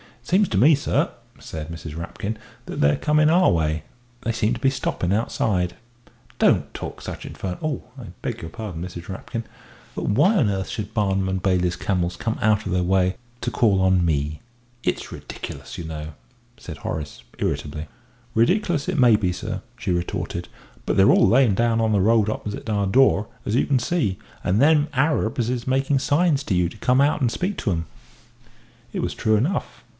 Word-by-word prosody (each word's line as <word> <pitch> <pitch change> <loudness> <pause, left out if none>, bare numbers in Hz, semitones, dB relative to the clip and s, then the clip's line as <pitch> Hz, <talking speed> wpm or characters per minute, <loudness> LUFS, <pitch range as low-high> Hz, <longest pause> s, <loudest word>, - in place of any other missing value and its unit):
"It - - -21
seems 195 +1 +3
to 95 - 0
me, 145 +9 +6
sir," 145 - 0 0.3
said 80 0 -7
Mrs. 80 -2 -7
Rapkin, 100 +5 -4 0.3
"that - - -6
they're 70 0 +4
coming 150 0 +3
our 180 +3 +5
way 80 -1 0 0.4
they 115 - -1
seem 110 +1 +1
to 120 - -4
be 135 - +3
stopping 95 -8 -1
outside." 95 -4 0 0.6
"Don't - - +3
talk - - -7
such - - -7
infernal 125 +8 -4
I 125 - -8 0.2
beg - - -4
your 80 - -6
pardon, 100 -4 -6
Mrs. 90 0 -7
Rapkin; 115 +4 -5 0.5
but - - -4
why 190 - +4
on 125 - +3
earth 95 -1 -2
should 105 -2 -5
Barnum 95 -3 +1
and 95 -1 -2
Bailey's 90 -2 +2
camels 90 -2 -1
come 115 -1 -3
out 110 0 +2
of - - -3
their 90 0 +2
way 95 0 +2 0.2
to - - -2
call 100 -5 +3
on 95 -2 +3
me? 75 -1 -1 0.4
It's - - -2
ridiculous, - - -8
you - - -5
know!" 80 -1 -6 0.4
said 80 -4 -8
Horace, 75 -4 -5 0.2
irritably. 75 +1 -2 0.5
"Ridicklous 155 - +2
it 185 -2 -1
may 125 -4 +6
be, 95 -4 0
sir," 90 - -4 0.2
she - - -2
retorted, 85 0 -2 0.4
"but - - 0
they're 95 - +7
all - - +5
layin' 125 -3 +5
down 115 +1 +2
on 110 -1 +2
the 100 -2 +3
road 110 +1 +4
opposite 105 0 -4
our 100 -2 +1
door, 110 -2 +4 0.2
as 105 - -1
you - - +3
can 135 -3 +2
see 120 - 0 0.3
and 100 +6 +2
them 150 0 +5
niggers 130 -5 +1
is 125 -1 -3
making 135 +1 +2
signs 145 +1 +2
to 95 - 0
you 90 -1 +2
to 110 - -13
come 125 +5 +3
out 145 +1 +2
and 120 -3 +2
speak 190 +10 -2
to 105 - -1
'em." 85 -1 -1 1.1
It - - -2
was - - -2
true 110 0 +2
enough. 125 - -1
105 Hz, 190 wpm, -23 LUFS, 90-130 Hz, 1.1 s, they're